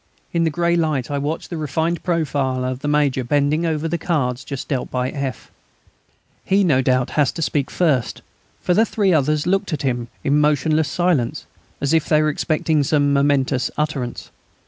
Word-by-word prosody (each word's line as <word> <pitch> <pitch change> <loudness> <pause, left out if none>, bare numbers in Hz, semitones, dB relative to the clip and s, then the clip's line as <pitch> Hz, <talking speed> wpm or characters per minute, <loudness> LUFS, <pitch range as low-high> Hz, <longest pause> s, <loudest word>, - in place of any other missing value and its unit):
In 170 -1 +2
the - - +2
grey 170 +2 +1
light 155 -6 0
I 140 - -1
watched 150 +5 -4
the 170 - -3
refined 160 +3 -1
profile 140 -7 -1
of 130 0 -3
the 145 - -4
Major 145 -3 +1
bending 145 +5 +1
over 160 0 -1
the 170 +1 -2
cards 140 -7 -1
just 140 -2 -6
dealt 135 -4 -2
by 125 0 -2
F. 135 -3 -5 0.9
He 195 +1 +2
no 145 -8 +3
doubt 125 -1 +1
has 145 -3 +2
to 165 - -5
speak 145 -2 -1
first, 150 -9 0 0.4
for 180 - +1
the 215 - +4
three 205 -4 +1
others 150 0 +1
looked 195 0 0
at 145 - -3
him, 120 -3 -1 0.2
in 145 +2 +2
motionless 150 +1 +2
silence, 170 -10 0 0.3
as 140 +2 0
if 160 -2 +1
they 155 - +4
were 155 0 +2
expecting 155 0 0
some 145 0 +2
momentous 140 -2 +1
utterance. 145 -5 -3
150 Hz, 185 wpm, -20 LUFS, 135-160 Hz, 0.9 s, the